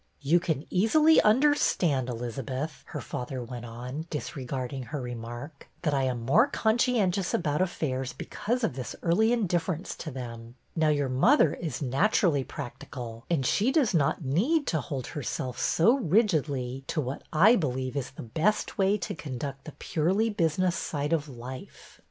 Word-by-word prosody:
You 155 +5 +4
can 160 -4 -2
easily 300 - +5
understand, 210 - +3
Elizabeth," 130 +5 -4
her - - -5
father 125 0 -5
went 120 0 -7
on, 125 +7 -6
disregarding 135 -3 -4
her 145 +4 -4
remark, 120 +4 -7 0.2
that 150 -3 +1
I 135 -1 +2
am 120 -3 -2
more 220 - +5
conscientious 220 -7 +1
about 150 -1 0
affairs 135 -8 -1
because 240 +3 -3
of 225 - +1
this 130 -2 -5
early 200 +7 +3
indifference 180 -6 -1
to 155 - -6
them. 120 -3 -8 0.2
Now 160 -2 +2
your 145 -2 +1
mother 140 - +4
is 155 -4 -4
naturally 145 - +2
practical, 120 -2 -8
and 155 -6 +1
she 215 - +2
does 265 -8 +2
not 150 -1 +1
need 245 - +2
to 160 - +1
hold 130 -1 -4
herself 130 -3 -4
so 220 +10 +4
rigidly 150 - +1
to 160 - -1
what 135 -1 -3
I 190 +9 +6
believe 130 - -2
is 140 -3 -2
the 130 - -9
best 165 - 0
way 195 +2 +3
to 180 - -4
conduct 135 -2 -6
the 155 - -8
purely 190 +8 0
business 175 -1 +1
side 150 -1 -2
of 150 -2 0
life. 130 +1 -10
150 Hz, 155 wpm, -28 LUFS, 130-185 Hz, 0.2 s, I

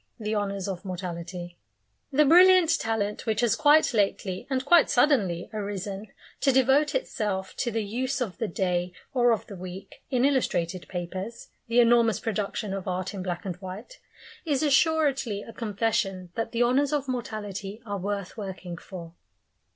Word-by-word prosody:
THE 215 0 -2
HONOURS 200 -2 -2
OF 185 -2 -4
MORTALITY 175 -1 -6 0.5
The 300 +2 +4
brilliant 355 +1 +6
talent 220 0 -2
which 220 0 +1
has 235 -4 +3
quite 300 -1 +5
lately 195 -3 0
and 260 -1 -1
quite 345 +2 +6
suddenly 210 - +2
arisen, 200 0 -4 0.3
to 275 - +3
devote 265 - +3
itself 210 - -2
to 245 - 0
the 225 -1 -1
use 255 +6 -2
of 225 -8 -3
the 225 - 0
day 180 -1 -1 0.2
or 245 -2 +4
of 225 - 0
the 200 - -9
week, 185 +1 -9
in 255 0 +2
illustrated 185 -10 0
papers 185 +6 -6 0.2
the 230 +1 +3
enormous 235 -2 +4
production 210 -2 -2
of 195 -1 -5
art 185 +1 -2
in 195 - -5
black 180 -1 -4
and 180 -3 -4
white 195 - -9 0.4
is 300 -3 0
assuredly 275 -7 +2
a 230 - -11
confession 200 -5 -1
that 225 - -3
the 235 +1 +2
Honours 270 +4 +2
of 285 -2 0
Mortality 215 -4 -4
are 205 -2 -3
worth 200 0 -3
working 190 -4 -6
for. 170 -2 -9
210 Hz, 160 wpm, -27 LUFS, 190-255 Hz, 0.5 s, brilliant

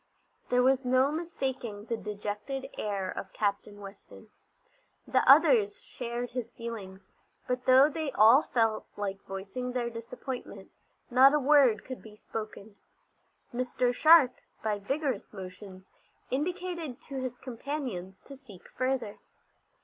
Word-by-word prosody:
There 250 0 +3
was 265 +1 +3
no 255 +2 +3
mistaking 265 -10 -4
the 230 - -2
dejected 210 +6 -5
air 195 -3 -3
of 190 - -7
Captain 205 0 -2
Weston. 200 0 -13 0.8
The - - +3
others 425 -2 +6
shared 245 - -5
his 245 -2 -4
feelings, 200 -6 -8 0.4
but 250 0 -2
though 260 +2 +7
they 310 -1 -3
all 225 +6 +7
felt 225 -5 0
like 200 -1 -4
voicing 200 +6 -5
their 240 -1 -2
disappointment, 230 -3 -7 0.4
not 265 +4 +7
a - - +3
word 270 -5 +4
could 255 -1 -7
be 215 -1 -13
spoken. 215 -1 -8 0.8
Mr. 250 0 0
Sharp, 310 -1 +7 0.3
by 210 -2 -1
vigorous 265 +1 -2
motions, 190 -1 -10 0.4
indicated 335 -1 -3
to 275 -2 -6
his 250 -1 -4
companions 235 -8 -6
to 275 - -11
seek 220 -10 -15
further. 255 -4 -2
245 Hz, 125 wpm, -29 LUFS, 205-270 Hz, 0.8 s, though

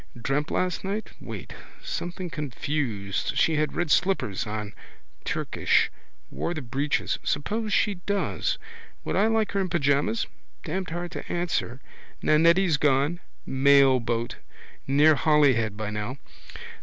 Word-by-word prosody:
Dreamt 135 +6 -1
last 185 -1 -1
night? 200 +3 -3
Wait. - - -7 0.3
Something 180 - -4
confused. 135 - -2
She 160 -2 +3
had 155 0 0
red 175 -3 -1
slippers 130 - +1
on. 105 -1 -4 0.5
Turkish. - - +1 0.4
Wore 175 - -3
the 155 - -4
breeches. 135 +5 -1
Suppose 210 +9 -1
she 205 - +3
does? 200 -1 0 0.5
Would - - -2
I 210 - +4
like 225 -1 +1
her 200 - 0
in 185 - -1
pyjamas? 140 - +1 0.4
Damned 190 0 -3
hard 175 +1 -4
to - - -7
answer. 170 -7 -2 0.4
Nannetti's 165 +2 +4
gone. 145 +3 +2 0.3
Mailboat. 130 -4 +3 0.5
Near 145 +3 +6
Holyhead 135 -8 +3
by 110 -1 -3
now. 105 +5 -4
150 Hz, 125 wpm, -26 LUFS, 130-175 Hz, 0.5 s, Near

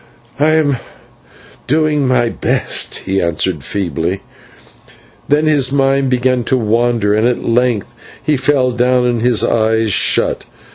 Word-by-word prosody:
"I 155 +2 +3
am 145 -4 +1 0.9
doing 150 -1 +1
my 120 -2 +1
best," - - -1
he 95 0 0
answered 85 -2 -2
feebly; 90 +1 -3 1.1
then 150 +2 +2
his 145 -4 +2
mind 135 -1 +1
began 125 0 +1
to 130 - +1
wander, 115 -2 0
and 110 +3 +2
at 125 - -2
length 120 -3 0 0.3
he 155 - +1
fell 130 -1 +1
down 125 +1 +1
and 120 -2 0
his 120 -2 +2
eyes 110 -1 +1
shut. - - +2
125 Hz, 135 wpm, -15 LUFS, 110-135 Hz, 1.1 s, I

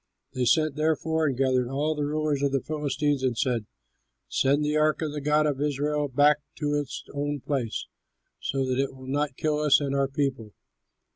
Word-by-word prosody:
They 130 -1 0
sent, 155 +3 +3
therefore, 160 +1 +1
and 135 -3 -1
gathered 130 -2 +2
all 145 +4 0
the 150 -1 -2
rulers 150 -1 0
of 140 -1 +1
the 135 - +2
Philistines 145 -2 -1
and 130 -3 0
said, 120 -4 0 0.6
"Send 145 +2 +2
the 150 +1 0
ark 155 +1 +2
of 155 - -2
the 150 0 -4
god 150 +1 +3
of 145 -2 -1
Israel 150 0 0
back 145 +2 +4 0.2
to 145 -1 -1
its 145 -3 -3
own 145 0 -2
place, 130 -6 -2 0.5
so 135 -1 -1
that 130 0 -1
it 135 -1 -3
will 130 0 -12
not 145 +1 -1
kill 150 -1 0
us 150 -2 +5
and 140 -2 -2
our 140 0 +2
people!" 135 -6 -2
145 Hz, 195 wpm, -26 LUFS, 135-150 Hz, 0.6 s, us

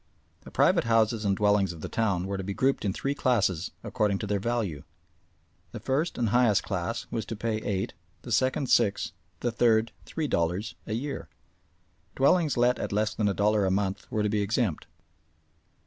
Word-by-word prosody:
The - - -12
private - - +3
houses 115 -1 +2
and 100 -1 +2
dwellings 100 -3 +3
of 80 - -11
the - - -4
town 100 -6 0
were 100 +1 -3
to 95 - -4
be 100 +1 -4
grouped 135 +1 +1
in 100 - +1
three 135 +8 -2
classes 100 - +1
according 105 -5 0
to 105 - -4
their 100 -1 0
value. 105 -8 -2 0.9
The - - -5
first 145 +6 -1
and 115 -3 +1
highest 120 -3 +3
class 90 -3 -3
was 115 - -2
to 115 - -4
pay 110 0 -1
eight, 95 -3 -2 0.3
the - - -8
second 130 0 +1
six, 100 - +2 0.3
the 120 - 0
third 115 -1 +3 0.2
three 160 -2 -2
dollars 90 +3 -1
a 110 - -3
year. 135 +5 -4 0.9
Dwellings 150 0 +3
let 120 +1 +3
at - - -3
less 105 +1 +1
than 105 - 0
a 100 - +2
dollar 105 +2 +2
a 95 - +2
month 95 0 -2
were 105 - 0
to - - +2
be 105 0 +1
exempt. 100 - -1
110 Hz, 190 wpm, -28 LUFS, 100-120 Hz, 0.9 s, private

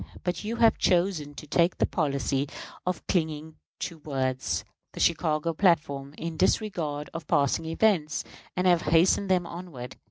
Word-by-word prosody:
But 180 +2 -2
you 220 +3 -2
have 230 -1 +4
chosen 170 -5 +1
to - - -8
take 170 +4 +2
the - - +3
policy 140 -3 -1 0.4
of 180 -3 -2
clinging 160 -3 -1 0.2
to 170 -2 -4
words 130 -3 -2 0.3
[the - - -8
Chicago 160 -1 +1
platform], 150 -6 +1
in 165 -1 -5
disregard 160 -8 0
of 165 -2 -6
passing 145 +3 +2
events, 165 -2 +1 0.3
and 180 - +1
have 175 -2 +5
hastened 180 +4 +3
them 180 -2 +3
onward. 170 -9 -8
165 Hz, 150 wpm, -27 LUFS, 145-180 Hz, 0.4 s, have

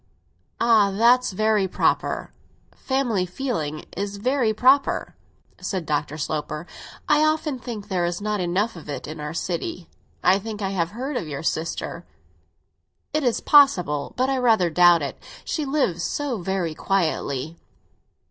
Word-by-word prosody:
"Ah, 225 -4 +5
that's 235 +5 +4
very 215 0 +2
proper; - - 0 0.4
family 255 -8 0
feeling 180 - -3
is 200 +1 -3
very 250 +1 +1
proper," 260 +6 +2 0.4
said 185 -4 -3
Dr. 150 0 -2
Sloper. 155 +1 -3 0.4
"I 300 0 +4
often 310 -3 0
think 225 -5 -7
there 185 -4 0
is 175 0 -1
not 210 0 -2
enough 185 +5 0
of 160 -3 -11
it 145 - -5
in 155 +1 -7
our 150 +2 -5
city. 170 0 -4 0.3
I 190 +2 +5
think 215 0 -6
I 195 -2 -1
have 170 -4 0
heard 255 +7 -4
of 165 - -4
your 145 0 -5
sister." 165 0 -3 1.1
"It 305 0 +1
is 245 -3 +1
possible, 180 - +4
but 255 +1 +2
I 270 0 0
rather 220 -8 +3
doubt 175 -1 +5
it; 140 - -5 0.2
she 310 - -2
lives 270 - 0
so 275 +2 -2
very 180 -3 -2
quietly." 160 -4 -1
195 Hz, 150 wpm, -23 LUFS, 170-245 Hz, 1.1 s, Ah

